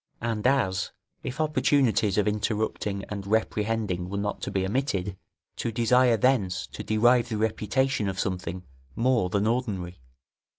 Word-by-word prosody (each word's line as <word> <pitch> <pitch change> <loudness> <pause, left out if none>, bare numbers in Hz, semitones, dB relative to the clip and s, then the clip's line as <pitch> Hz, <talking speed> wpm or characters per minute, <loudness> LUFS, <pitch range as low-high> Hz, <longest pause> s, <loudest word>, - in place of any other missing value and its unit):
And, 115 0 -1
as 120 -9 +1 0.3
if 130 - -6
opportunities 140 -9 +2
of 105 - +2
interrupting 105 -1 -1
and 100 -2 -5
reprehending 105 -4 0
were 100 - -3
not 100 0 -2
to - - -3
be 95 -1 0
omitted, 100 -4 -1 0.4
to 115 - -2
desire 120 +1 +4
thence 100 -7 +1
to - - -6
derive 120 +2 +3
the 110 - -2
reputation 110 +2 0
of 95 0 -4
something 90 -1 -3 0.3
more 115 -5 +2
than 100 +2 +1
ordinary. 105 - -2
110 Hz, 140 wpm, -27 LUFS, 100-120 Hz, 0.4 s, desire